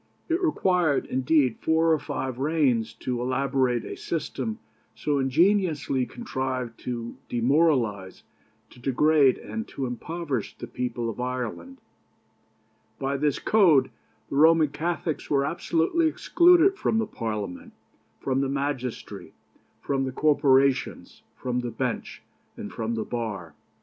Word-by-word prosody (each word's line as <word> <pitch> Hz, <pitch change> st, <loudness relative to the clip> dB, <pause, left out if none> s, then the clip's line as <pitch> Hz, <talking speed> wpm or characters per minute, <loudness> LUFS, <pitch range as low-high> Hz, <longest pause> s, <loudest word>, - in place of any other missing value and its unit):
It 335 Hz, +3 st, +1 dB
required, 180 Hz, -, +2 dB
indeed, 130 Hz, -1 st, +1 dB
four 160 Hz, +1 st, +3 dB
or 155 Hz, -, +1 dB
five 130 Hz, -3 st, -4 dB
reigns 135 Hz, -7 st, +1 dB
to 125 Hz, -1 st, -2 dB
elaborate 130 Hz, -1 st, 0 dB
a -, -, -6 dB
system 220 Hz, +7 st, -3 dB, 0.4 s
so 145 Hz, -2 st, -1 dB
ingeniously 150 Hz, -2 st, +2 dB
contrived 130 Hz, -, -4 dB
to 120 Hz, -2 st, -4 dB
demoralize, 120 Hz, -, +1 dB, 0.5 s
to -, -, -16 dB
degrade, 140 Hz, +2 st, +3 dB
and 225 Hz, 0 st, -6 dB
to 135 Hz, -, -4 dB
impoverish 140 Hz, +1 st, -4 dB
the -, -, -6 dB
people 120 Hz, 0 st, -3 dB
of 115 Hz, +1 st, -5 dB
Ireland. 125 Hz, -, -4 dB, 1.2 s
By 135 Hz, +1 st, -2 dB
this 145 Hz, 0 st, +1 dB
code 180 Hz, -11 st, +4 dB, 0.4 s
the 140 Hz, -, -1 dB
Roman 160 Hz, 0 st, +5 dB
Catholics 160 Hz, 0 st, -3 dB
were 140 Hz, -1 st, +2 dB
absolutely 170 Hz, -, +1 dB
excluded 355 Hz, +4 st, +4 dB
from 220 Hz, -, +1 dB
the 225 Hz, -, +1 dB
Parliament, 105 Hz, -, -5 dB, 0.5 s
from 135 Hz, 0 st, 0 dB
the 135 Hz, -, -1 dB
magistracy, 135 Hz, -3 st, -4 dB, 0.5 s
from 135 Hz, -1 st, -1 dB
the 130 Hz, -, -3 dB
corporations, 140 Hz, -2 st, +2 dB
from 125 Hz, -1 st, -2 dB
the 120 Hz, -1 st, -3 dB
bench, -, -, -4 dB, 0.3 s
and -, -, -7 dB
from 115 Hz, +1 st, -2 dB
the 110 Hz, -, -3 dB
bar. 105 Hz, -9 st, -4 dB
135 Hz, 125 wpm, -26 LUFS, 125-160 Hz, 1.2 s, Roman